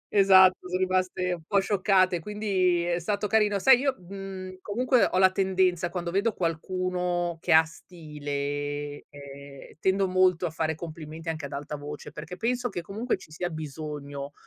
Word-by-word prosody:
Esatto, 190 -2 +6
sono 180 0 -1
rimaste 185 -1 0
un 170 -2 -4
po' 200 - +3
scioccate, 190 -2 +2
quindi 185 -2 0
è 175 0 0
stato 205 +4 -1
carino. 210 -1 +2
Sai, 260 +5 +6
io, 270 0 0
mhmm, 185 0 -8
comunque 250 +5 +2
ho - - -1
la 185 0 +6
tendenza, 185 -2 +1
quando 170 0 -4
vedo 200 +5 +1
qualcuno 180 0 -2
che 170 0 +1
ha 160 +1 +8
stile, 145 -3 -5
ehm, 140 -1 -12
tendo 190 +1 +1
molto 185 -1 +3
a - - -4
fare 160 0 -2
complimenti 160 0 -7
anche 160 -2 -4
ad 140 - -8
alta 145 +1 -5
voce 145 0 -8
perché 160 +4 -8
penso 240 +4 -1
che 175 - -5
comunque 215 +8 -2
ci 185 - -15
sia 175 +3 -3
bisogno 145 -2 -6
180 Hz, 165 wpm, -27 LUFS, 155-190 Hz, -, ha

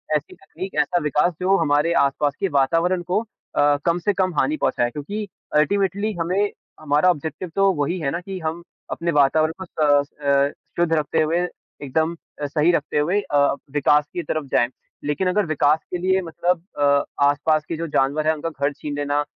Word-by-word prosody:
ऐसी 150 -1 -3
तकनीक, 190 +1 -8
ऐसा 175 - 0
विकास 150 +4 +2
जो 190 +2 +3
हमारे 150 0 +2
आस-पास 140 +1 0
के 195 - +1
वातावरण 165 +6 +2
को 190 - +3 0.4
अ, 145 0 +4
कम 170 +1 +2
से 205 +4 +1
कम 185 -1 0
हानि 310 - +1
पहुँचाएँ। 120 - +1
क्योंकि 200 - -5 0.3
अल्टीमेटली 200 +6 +1
हमें 185 +5 0 0.3
हमारा 150 +3 +3
ऑब्जेक्टिव 160 +2 -2
तो 195 0 +4
वही 150 +3 -1
है 140 -4 -1
ना 170 - -2
कि 190 +1 -6
हम 165 +1 -4 0.3
अपने 170 0 -1
वातावरण 155 +2 +3
को - - -4
स 145 -4 +2
अ, 140 0 +3 0.3
शुद्ध 170 -1 +2
रखते 155 -2 +1
हुए 160 +2 +1 0.4
एकदम 160 +5 0 0.3
अ, - - 0
सही 150 +4 +2
रखते 150 -3 -1
हुए 175 +7 +2
अ, 145 - -1 0.3
विकास 145 +1 +3
की 175 - -3
तरफ 155 0 -2
जाएँ। 120 - +3 0.4
लेकिन 150 +6 -1
अगर 200 +2 +1
विकास 155 -1 +2
के - - +1
लिए 190 +2 +1
मतलब 175 0 -1 0.2
अ, 140 -1 +4 0.2
आस-पास 150 +2 +2
के 165 - -2
जो 165 +1 -3
जानवर 150 +1 +1
हैं, 160 - +4
उनका 160 +1 -4
घर 140 -1 -2
छीन 145 0 -6
लेना, 145 0 0
155 Hz, 190 wpm, -22 LUFS, 145-180 Hz, 0.4 s, अ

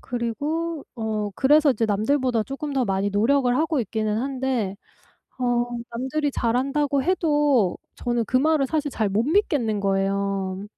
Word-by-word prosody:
그리고 290 +7 -3
어 215 -2 -2
그래서 295 +4 +4
이제 240 -3 0
남들보다 230 +3 +1
쪼끔 280 +3 -5
더 265 -2 +1
많이 195 -1 0
노력을 245 +5 +2
하고 310 -2 +1
있기는 215 0 -2
한데 255 -6 -2 0.6
어 245 -1 +1 0.2
남들이 265 +5 -2
"잘한다."고 275 +3 0
해도 295 - +2 0.2
저는 240 -1 -1
그 255 - +1
말을 300 0 +3
사실 300 +1 -1
잘 220 -5 -1
못 200 +3 +1
믿겠는 280 - +1
거예요. 195 0 -1
250 Hz, 295 characters per minute, -24 LUFS, 215-285 Hz, 0.6 s, 그래서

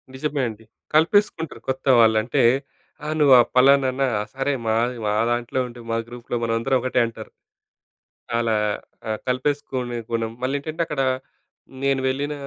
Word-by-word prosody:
నిజమే 145 +1 -2
అండి. 110 0 -11 0.3
కలిపేసుకుంటారు. 165 -1 +2
కొత్త 130 0 -3
వాళ్ళు. 110 -1 +5
అంటే, 115 - +1 0.6
ఆ! - - -3
నువ్వు 145 -3 +6
ఆ - - +9
పలానానా? 135 0 +4
ఆ! - - -2
సరే 135 +1 0
మా 110 - +2 0.3
మా 105 - +1 0.2
దాంట్లో 120 +2 -1
ఉండు. 120 0 -11
మా 115 - +1
గ్రూప్‌లో 120 0 -5
మనందరం 115 +3 +1
ఒకటే, 130 -1 +1
అంటారు. 115 - -9 1.1
అలా 115 -1 +1 0.6
ఆహ్, 110 -1 -2
కలిపేసుకునే 130 -2 -2
గుణం, 115 -1 -1
మళ్ళీ 130 +2 -1
ఏంటంటే 155 +3 -5
అక్కడ, 150 -3 -2 0.8
నేను 135 -1 +2
వెళ్ళిన 140 +3 -1
130 Hz, 145 wpm, -23 LUFS, 115-140 Hz, 1.1 s, ఆ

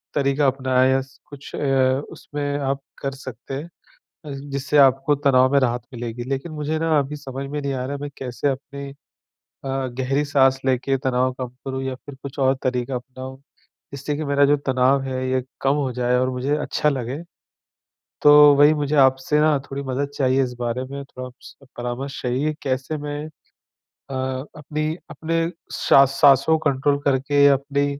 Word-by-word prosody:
तरीका 140 0 +2
अपनाएँ 130 -1 +2
या 135 - +3
स 130 0 -15
कुछ 140 -1 -10
अ, 135 -1 +2
उसमें 145 -1 -4
आप 135 0 -1 0.2
कर 135 - -2
सकते 130 -1 -9
हैं 140 +3 -3 0.6
अ, - - -6 0.2
जिससे 140 +2 0
आपको 135 +1 +5
तनाव 135 -2 +3
में 140 - +5
राहत 120 -1 0
मिलेगी। 120 0 -5
लेकिन 140 +4 -3
मुझे 155 +1 -2
ना 160 -1 +2
अभी 145 +1 -2
समझ 135 -1 -6
में 150 0 -3
नहीं 140 -1 -2
आ 125 0 -3
रहा 140 - -4
है - - -11
मैं 145 0 -5
कैसे 130 +2 -2
अपनी 140 +1 -5
अ, - - -13 1.1
गहरी 135 +3 0
साँस 135 -2 +3
लेके 135 +1 +1
तनाव 130 0 +2
कम 130 - -2 0.2
करूँ 135 0 -3
या 130 -1 -3
फिर 140 +2 -12
कुछ 140 +1 -7
और 135 0 +3
तरीका 125 0 -1
अपनाऊँ, 130 +1 -8 0.6
जिससे 140 +2 -3
कि 155 - -3
मेरा 140 0 +3
जो 145 +1 +3
तनाव 130 +1 +3
है 130 -1 -3
ये 130 -1 +1 0.2
कम 135 +1 +2
हो 140 -3 -1
जाए 125 0 +1
और 130 +1 +1
मुझे 130 +3 -1
अच्छा 150 0 0
लगे। 135 +1 -3 1.0
तो 145 - +8 0.2
वही 145 +2 +6
मुझे 150 0 -1
आपसे 130 +2 +3
ना 150 -1 +4
थोड़ी 140 +1 -4
मदद 135 +1 -2
चाहिए 135 -1 +2
इस 125 - -5
बारे 120 +1 -1
में 140 0 -5
थोड़ा-सा 130 +1 -11
परामर्श 125 +3 -4
चाहिए 130 +5 0
कैसे 135 +2 -2
मैं 145 0 -5 0.7
अ, 135 - -12 0.4
अपनी 155 +1 -3 0.2
अपने 165 +1 -1 0.2
सा 135 - +5
साँसों 135 +3 +4
को 150 -2 +1
कंट्रोल 140 +2 +1
करके 140 +1 +3
अपने 140 +1 +1
135 Hz, 180 wpm, -22 LUFS, 130-145 Hz, 1.1 s, तो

